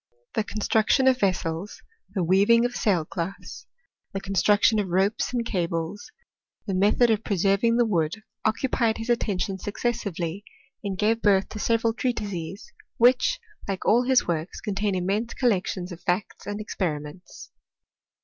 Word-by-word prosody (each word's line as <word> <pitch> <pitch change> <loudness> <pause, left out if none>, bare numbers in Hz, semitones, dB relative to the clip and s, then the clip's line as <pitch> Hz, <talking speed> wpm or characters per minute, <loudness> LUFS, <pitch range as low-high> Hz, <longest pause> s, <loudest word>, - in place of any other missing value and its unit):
The 220 - 0
con 210 +1 -6
struction 225 +6 +3
of 255 -1 +4
vessels, 185 -1 -2 0.3
the 185 - +1
weaving 200 +7 +4
of 245 0 -2
sailcloths, 180 -1 -2 0.5
the 195 - -2
construction 205 +3 +3
of 200 - -1
ropes 195 +7 +1
and 240 -2 -1
cables, 170 -1 -3 0.5
the 195 - -2
method 210 +5 +3
of 220 0 0
pre 200 - -1
serving 200 +6 +3
the 240 - +4
wood, 180 0 -1 0.2
occupied 230 0 +1
his 225 +2 -2
attention 195 -4 -1
successively, 200 -5 -3 0.4
and 195 -2 -3
gave 225 +3 +1
birth 195 -2 +3
to 215 - -7
several 230 +1 +1
treatises, 200 -7 -4 0.2
which, 250 - +4 0.3
like 195 -2 -3
all 240 +3 +4
ms 260 -1 +3
works, 165 -1 -2
contain 205 -1 -1
immense 200 +6 -1
collections 195 -6 0
of 175 - -9
facts 180 +3 -2
and 205 0 -3
experi 180 -7 -2
ments. 150 +5 -12
205 Hz, 150 wpm, -25 LUFS, 185-230 Hz, 0.5 s, of